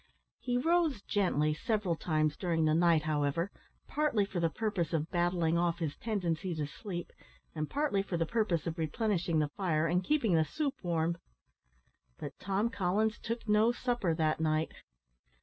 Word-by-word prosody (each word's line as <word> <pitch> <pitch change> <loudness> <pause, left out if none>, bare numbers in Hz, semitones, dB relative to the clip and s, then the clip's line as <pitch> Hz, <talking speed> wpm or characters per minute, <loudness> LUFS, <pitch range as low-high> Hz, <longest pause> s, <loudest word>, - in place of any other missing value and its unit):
He 245 -1 -1
rose 320 - +2
gently 155 -7 +1
several 200 +1 0
times 155 -2 0
during 165 -4 0
the 155 - +3
night, 165 -1 +4
however, 155 +4 0 0.4
partly 295 -9 +1
for 195 -2 -4
the 165 -1 +2
purpose 200 -4 -2
of 160 0 -1
battling 175 -1 +2
off 170 -1 +1
his 160 -4 -3
tendency 185 -5 -2
to 150 -2 -1
sleep, 175 +3 -6 0.4
and 155 -2 -3
partly 285 -9 +1
for 195 -3 -3
the 165 - +1
purpose 200 -5 0
of 165 0 -3
replenishing 170 0 0
the 150 -1 +2
fire 160 -2 0
and 175 +3 +1
keeping 240 -6 +2
the 160 -1 +5
soup 275 - -2
warm. 170 -1 0 1.0
But 140 - -6
Tom 200 +4 0
Collins 205 +4 0
took 230 0 -4
no 215 +2 +4
supper 240 -9 0
that 155 -1 +1
night. 155 0 +1
175 Hz, 165 wpm, -32 LUFS, 160-210 Hz, 1.0 s, the